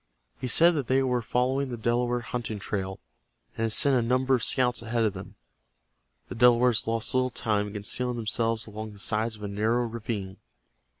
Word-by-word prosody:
He 130 - -3
said 170 +8 +5
that 145 -7 -2
they 135 +1 +3
were 125 -2 0
following 130 +4 0
the 120 - -5
Delaware 120 +2 0
hunting 120 -2 -4
trail, 95 -1 -4 0.6
and 115 - -1
had 110 - -1
sent 140 +5 +4
a 125 - +3
number 130 +3 +1
of 125 - +2
scouts 125 -3 +1
ahead 115 0 -1
of 105 -3 +1
them. 95 -1 -10 0.9
The - - -7
Delawares 120 -1 +4
lost 115 0 -1
little 130 0 +2
time 105 -4 -1
in 100 - -9
concealing 120 +4 -2
themselves 115 0 -1
along 110 0 -7
the - - -14
sides 110 +2 -1
of 105 - -12
a - - -3
narrow 110 +4 0
ravine. 110 -4 -5
115 Hz, 190 wpm, -27 LUFS, 110-125 Hz, 0.9 s, said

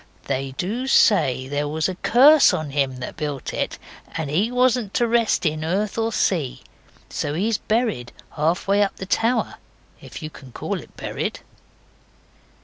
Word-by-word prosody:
They 135 -1 -2
do 230 +8 -2
say 130 - +3
there 145 +1 -2
was 155 +1 0
a 185 - -3
curse 275 - +6
on 155 -3 -4
him 135 -2 0
that 125 - -6
built 145 -4 -4
it, - - -2 0.4
and 155 -4 -3
he 195 +9 +2
wasn't 250 -4 +1
to 240 - +3
rest 230 -4 +2
in 155 0 0
earth 195 +6 -1
or 225 0 0
sea. 165 - 0 0.5
So 145 - -3
he's 215 +5 0
buried 215 - -1 0.2
half 160 +5 0
way 200 +1 +3
up 200 - +1
the 190 - -7
tower 230 +5 0 0.4
if - - -10
you 155 - -5
can 130 -5 -14
call - - -3
it - - -15
buried. - - -4
180 Hz, 165 wpm, -22 LUFS, 145-225 Hz, 0.5 s, curse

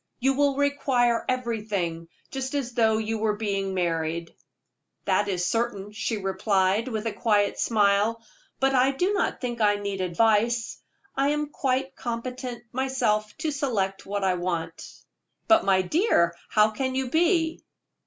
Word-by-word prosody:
You 270 +2 +2
will 280 0 +2
require 270 -4 +1
everything, 210 -9 -2 0.2
just 265 +1 -4
as 260 -4 -2
though 220 -2 +3
you 220 0 -2
were 215 -1 +1
being 195 -3 -2
married." 165 -1 -2 0.7
"That 205 - +2
is 180 -3 -1
certain," 210 -3 -1
she 220 +1 -2
replied, 195 +2 +1
with 220 -3 -3
a 225 - -1
quiet 205 -3 +1
smile; 215 +1 +2 0.4
"but 270 0 +2
I 260 +1 +3
do 360 +9 0
not 395 - 0
think 240 -2 -4
I 205 -1 +4
shall 205 - -7
need 200 -1 -3
advice. 225 +5 +1 0.4
I 275 +1 +2
am 295 0 -1
quite 265 -1 -1
competent 245 0 -5
myself 235 -5 0
to 310 0 -2
select 220 -9 -2
what 200 0 -2
I 190 -1 +3
want." 170 -2 -4 0.6
"But, 330 0 +5
my 190 -1 +3
dear 300 - +3
child, 170 - -17
how 215 0 +4
can 260 +4 -2
you 260 -2 -2
be?" 330 0 +2
225 Hz, 155 wpm, -26 LUFS, 200-265 Hz, 0.7 s, But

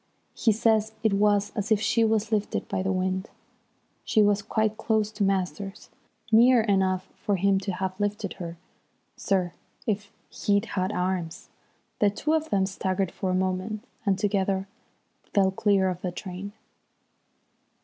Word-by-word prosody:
He 225 - +2
says 220 0 +2
it 220 -2 +3
was 205 0 +3
as 210 0 -3
if 215 - +5
she 230 +1 +2
was 220 -1 +1
lifted 210 -1 -1
by 195 -2 -1
the 190 +1 0
wind. 185 +1 -1 0.7
She 215 - +3
was 205 0 +3
quite 215 +1 0
close 220 -1 0
to 210 -1 -2
Masters. 195 +1 -2 0.4
"Near 240 +2 +7
enough 190 -3 +1
for 205 -2 -1
him 195 +1 +2
to 195 0 -3
have 190 +1 -3
lifted 205 -1 -2
her, 170 -1 -6 0.6
sir, 185 -3 0 0.3
if 205 -2 -2 0.2
he'd 200 +1 +1
had 190 -3 -1
arms." 180 -3 -2 0.5
The 205 - +5
two 295 +10 -1
of 315 0 0
them 195 -2 +2
staggered 190 -1 -1
for 190 - -3
a 185 - +1
moment, 185 +4 -1 0.2
and 200 -3 +2
together 195 -1 0 0.7
fell 195 -2 +4
clear 195 -1 +2
of 180 -1 -3
the 180 - -2
train. 190 +2 -7
200 Hz, 155 wpm, -26 LUFS, 190-215 Hz, 0.7 s, Near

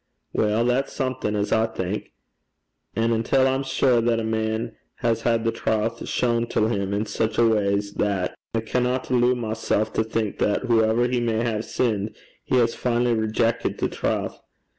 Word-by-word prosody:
'Weel, 110 +2 +2
that's 125 +3 0
something 130 -5 -2
as 105 0 -1
I 110 0 +3
think. 100 -2 -4 0.8
An' 115 +1 +1
until 115 +4 +2
I'm 135 +1 +1
sure 130 -2 +2
that 115 0 +1
a - - -2
man 110 +1 -2 0.2
has 115 -2 0
had 115 -1 +1
the 115 - +1
trowth 110 +1 -1
shawn 120 -1 +1
till 110 -1 +1
him 100 -4 -1
in 105 +2 0
sic 110 +1 -2
a 120 - +5
way 100 -2 +2
's 100 0 -7
that, 100 -4 0 0.2
I 115 - +1
canna 125 +3 0
alloo 125 0 +4
mysel' 110 -2 0
to 110 +1 -1
think 110 -2 -2
that 105 - +1
hooever 115 0 +3
he 125 0 0
may 115 -1 0
hae 110 -3 -1
sinned, 110 -3 -1 0.3
he - - 0
has 115 -2 +3
finally 120 0 +1
rejeckit 110 +1 0
the - - 0
trowth. - - -2
115 Hz, 180 wpm, -24 LUFS, 110-120 Hz, 0.8 s, a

